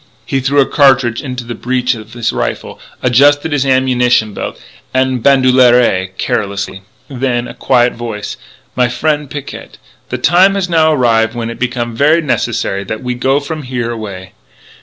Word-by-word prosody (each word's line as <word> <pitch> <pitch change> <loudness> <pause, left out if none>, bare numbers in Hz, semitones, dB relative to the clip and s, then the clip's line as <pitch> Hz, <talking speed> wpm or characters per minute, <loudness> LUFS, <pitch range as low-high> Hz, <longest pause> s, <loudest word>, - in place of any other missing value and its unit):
He 135 - -1
threw 135 +2 +1
a 135 - +5
cartridge 130 -5 +3
into 125 -3 -5
the 120 0 -6
breech 125 +2 -1
of 110 -1 -10
his 120 -2 -2
rifle, - - -4 0.2
adjusted 145 +5 +3
his 140 -2 0
ammunition 125 -4 +2
belt - - -6 0.4
en 130 -1 +1
bandoulière, 125 -8 +3
carelessly. 100 -1 -3 0.3
Then, 130 -2 -1
in - - -8
a 115 - -9
quiet 120 0 +2
voice: 115 -3 -6 0.4
"My 125 -1 +2
frien' 150 +3 -1
Picquet, 145 0 -8 0.3
the - - -3
time 190 +3 +4
has 195 -2 -1
now 160 -2 +3
arrive 115 -5 +2
when 115 -1 -3
it - - -10
become 120 -2 -2
ver' 150 +6 +3
necessary 115 -9 -1
that 110 +5 -6
we 125 0 -2
go 135 +3 +1
from 155 +2 -6
here 125 -3 -3
away. 100 -5 -7
125 Hz, 165 wpm, -14 LUFS, 115-140 Hz, 0.4 s, a